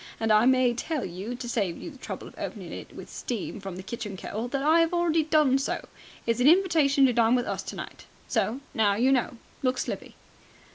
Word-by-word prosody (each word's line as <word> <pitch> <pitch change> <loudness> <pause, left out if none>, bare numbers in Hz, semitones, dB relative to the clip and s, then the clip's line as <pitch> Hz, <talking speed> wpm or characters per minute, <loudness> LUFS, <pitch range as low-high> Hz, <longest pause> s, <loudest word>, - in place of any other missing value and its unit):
And 225 -1 +1
I 215 +3 +5
may 255 -2 +4
tell 280 0 -2
you, 190 +7 -5
to 245 0 -6
save 200 -8 -1
you - - -7
the 275 - -14
trouble - - -6
of - - -13
opening - - -6
it - - -9
with - - -9
steam 235 -6 -5
from 195 -2 -7
the 185 - -7
kitchen 210 -1 -6
kettle, 220 +5 -4
that 270 +2 -2
I 320 +3 +5
'ave 330 - +2
already 340 -2 +2
done 300 -4 +3
so. 275 - -3 0.4
It's 230 0 +1
an 250 - +4
invitation 315 -6 +5
to 255 - +3
dine 235 +1 +4
with 245 -1 +1
us - - -3
tonight. - - -8 0.2
So 250 +6 0
now 205 -3 +3
you 250 +5 +3
know. 250 -2 +1 0.2
Look 255 -1 +1
slippy!" - - -4
250 Hz, 220 wpm, -27 LUFS, 225-280 Hz, 0.4 s, I